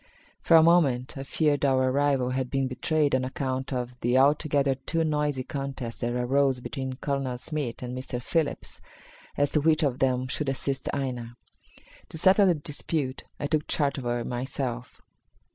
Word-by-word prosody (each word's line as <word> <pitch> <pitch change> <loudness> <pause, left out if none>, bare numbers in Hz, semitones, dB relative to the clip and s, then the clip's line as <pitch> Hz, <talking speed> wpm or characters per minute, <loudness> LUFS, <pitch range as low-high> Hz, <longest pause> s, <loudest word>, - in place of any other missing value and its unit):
For 165 - +6
a 160 - +7
moment 145 -7 +3
I 135 - -5
feared 145 +1 0
our 130 -2 +3
arrival 135 -2 +1
had 130 -1 -2
been 135 -1 0
betrayed 145 +4 0
on 130 0 +2
account 130 0 -3
of 125 -1 -4
the 120 +2 +2
altogether 140 0 +3
too 160 +5 -2
noisy 150 -4 0
contest 135 -4 -5
that 120 0 -1
arose 130 +2 +2
between 130 +1 -5
Colonel 135 -2 -2
Smith 135 -3 -4
and 125 0 -5
Mr. 130 -1 -4
Phillips 155 +4 -2 0.6
as 145 0 +2
to 150 - +2
which 160 +1 +3
of 135 -4 0
them 130 -1 +1
should 140 +2 -2
assist 135 0 -2
Aina. 125 -4 -4 0.7
To - - -7
settle 190 +4 +5
the 175 - +4
dispute 150 -2 -3
I 145 - -2
took 150 0 0
charge 140 -2 0
of 130 - -7
her 120 -1 -1
myself. 125 -1 -4
135 Hz, 170 wpm, -27 LUFS, 125-145 Hz, 0.7 s, a